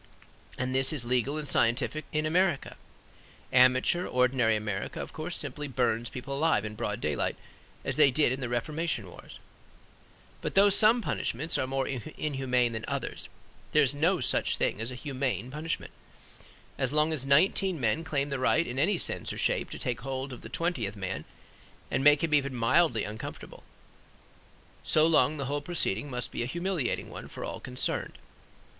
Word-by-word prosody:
And 125 0 -2
this 130 0 +5
is 145 -6 -3
legal 125 +4 0
and 150 -1 -4
scientific 135 +6 +1
in 155 0 0
America. 175 -1 +1 0.8
Amateur 130 +7 +4
ordinary 125 -3 +2
America, 105 - -3
of - - -6
course, 160 +3 -5
simply 145 0 -5
burns 120 -3 0
people 135 +2 -6
alive 155 -7 +2
in 105 - -5
broad 105 -2 -3
daylight, 75 -1 -1 0.5
as - - -2
they 150 -2 +7
did 145 -1 +2
in 130 - -2
the 125 -3 -3
Reformation 135 - -2
Wars. - - -12 1.0
But - - -4
though 200 +1 +7
some 220 +4 +7
punishments 155 0 -2
are 130 - 0
more 135 0 -1
inhuman 130 -2 -1
than 110 0 -4
others - - -4 0.4
there 150 - +6
is 135 0 +2
no 165 +6 +2
such - - +2
thing - - 0
as 115 - -2
humane 130 -1 -3
punishment. 155 +3 -4 0.9
As 135 -1 0
long 150 +2 +2
as 145 -5 -1
nineteen 170 +5 +3
men 125 +6 0
claim 145 -2 -1
the 140 -1 -2
right 155 +6 +2
in 130 -2 -4
any 185 +6 +2
sense - - -2
or - - -6
shape - - 0
to - - -7
take 120 -2 -3
hold 135 +1 -4
of 120 - -9
the - - -9
twentieth 135 - -1
man 95 -6 -4 0.7
and 135 - 0
make 145 +1 +6
him 160 -2 0
even 140 -3 +2
mildly 120 0 +3
uncomfortable, 105 +1 -8 1.2
so 155 0 +3
long 155 -2 +3
the 140 - -3
whole 145 +2 -2
proceeding 145 - 0
must 125 -2 -4
be - - -3
a 120 - -1
humiliating 170 -3 -2
one - - -8
for - - -7
all - - -5
concerned. 125 0 -2
135 Hz, 175 wpm, -29 LUFS, 125-155 Hz, 1.2 s, they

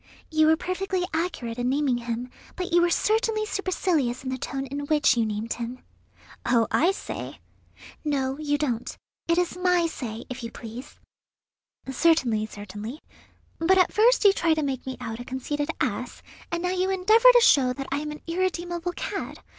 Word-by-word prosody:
"You 310 0 +4
were 320 0 +5
perfectly 370 +1 -2
accurate 320 -9 -2
in 245 +1 0
naming 270 -3 +1
him, 240 +1 -4 0.2
but 365 -1 -4
you 345 - +6
were 345 - +3
certainly 435 +3 +1
supercilious 340 - -1
in 260 - -3
the 260 - -2
tone 270 +2 -3
in 285 +2 -5
which 300 -4 +4
you 230 -2 +1
named 215 +2 -3
him." 240 +1 -5 0.7
"Oh, 230 -2 +3
I 345 +5 +4
say!" 390 - -6 0.6
"No, 270 -3 0
you 290 -1 0
don't; 250 -6 -2 0.3
it 335 0 +2
is 355 -1 +1
my 360 -1 +2
say, 240 -8 -5
if 255 0 -6
you 230 - -5
please." 240 +6 -10 0.9
"Certainly, 260 -6 +2
certainly; 210 +7 -8 0.6
but 370 +3 +4
at 365 - +3
first 455 +1 +4
you 400 - +8
try 330 -4 +2
to 310 - -1
make 265 -2 -3
me 260 - -4
out 225 0 -5
a - - -5
conceited 290 +4 -3
ass, - - -3 0.3
and 340 +1 -2
now 360 - 0
you 370 +1 0
endeavour 435 +6 +6
to 485 - +7
show 260 - +5
that 270 +2 -5
I 275 - 0
am 300 0 -4
an 300 0 -8
irredeemable 350 0 -2
cad. - - -4
300 Hz, 180 wpm, -26 LUFS, 250-360 Hz, 0.9 s, you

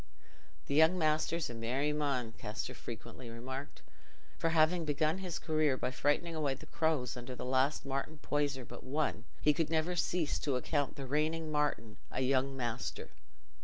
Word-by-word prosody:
"Th' - - -7
young 160 +5 +6
measter's 155 0 +2
a - - -6
merry 125 +6 0
mon," 140 -6 0
Kester 110 +3 -5
frequently 120 0 -8
remarked; 130 +4 -6 0.6
for 165 - +2
having 165 +2 +4
begun 155 +3 +1
his 180 -3 -3
career 155 -4 +2
by 130 - -1
frightening 145 +6 +1
away 145 -4 0
the - - -12
crows 160 -6 0
under 125 +1 -6
the - - -5
last 130 +3 +2
Martin 135 +3 -2
Poyser 145 -3 -1
but - - -9
one, 130 -5 -1 0.2
he 150 - +6
could 160 +1 0
never 165 +2 +1
cease 170 -2 +1
to 140 -3 0
account 145 +3 0
the 140 - -5
reigning 155 +3 0
Martin 145 -8 0
a - - -2
young 135 +1 +2
master. 120 -1 -3
145 Hz, 165 wpm, -34 LUFS, 130-155 Hz, 0.6 s, young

